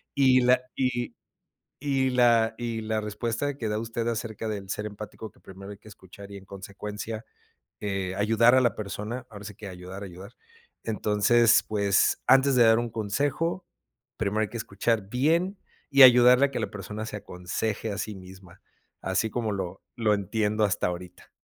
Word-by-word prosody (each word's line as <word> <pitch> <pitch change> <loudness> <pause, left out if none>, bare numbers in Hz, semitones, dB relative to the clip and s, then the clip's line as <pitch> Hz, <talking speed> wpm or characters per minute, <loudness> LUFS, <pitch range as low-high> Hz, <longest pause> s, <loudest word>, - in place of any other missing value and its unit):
Y 130 -2 +5
la 125 +1 +4
y 120 -2 -1 0.7
y 135 -2 0
y - - +1
la 115 -2 +4
y 115 -2 -3
la 110 0 -1
respuesta 115 +6 -3
que 115 - -3
da 105 - -1
usted 115 +1 -3
acerca 115 -1 -3
del 100 -3 -5
ser 105 - -3
empático, 105 0 -8
que - - -26
primero 95 +1 -11
hay 100 - -10
que 105 - -19
escuchar 100 +1 -13
y, 100 - -8
en 95 - -13
consecuencia, 105 +3 -7 0.6
eh, 95 -2 -2
ayudar 115 +4 +4
a 130 - +5
la 120 - +1
persona, 110 +4 -5
ahora 105 -1 -11
sí 105 -2 -8
que 105 - -9
ayudar 90 +2 -9
a - - -5
ayudar. 95 +5 -12 0.5
Entonces, 110 +2 +3
pues, 100 -2 +2
antes 135 +1 +5
de 120 - +6
dar 115 0 +5
un 120 - -3
consejo, 145 - -1 0.5
primero 110 0 0
hay 110 - -1
que 120 - -6
escuchar 105 -1 -1
bien 165 - +1 0.3
y 140 -1 +8
ayudarle 125 +1 +8
a - - -12
que - - -3
la - - -2
persona 105 +2 -6
se 110 - -6
aconseje 100 +3 -4
a 100 - -4
sí 105 0 -4
misma, 95 -1 -14 0.4
así 110 - 0
como 115 -1 -2
lo 95 -1 -5
lo 110 -3 +2
entiendo 105 +2 -1
hasta 100 - 0
ahorita. 90 0 -7
110 Hz, 180 wpm, -26 LUFS, 100-120 Hz, 0.7 s, y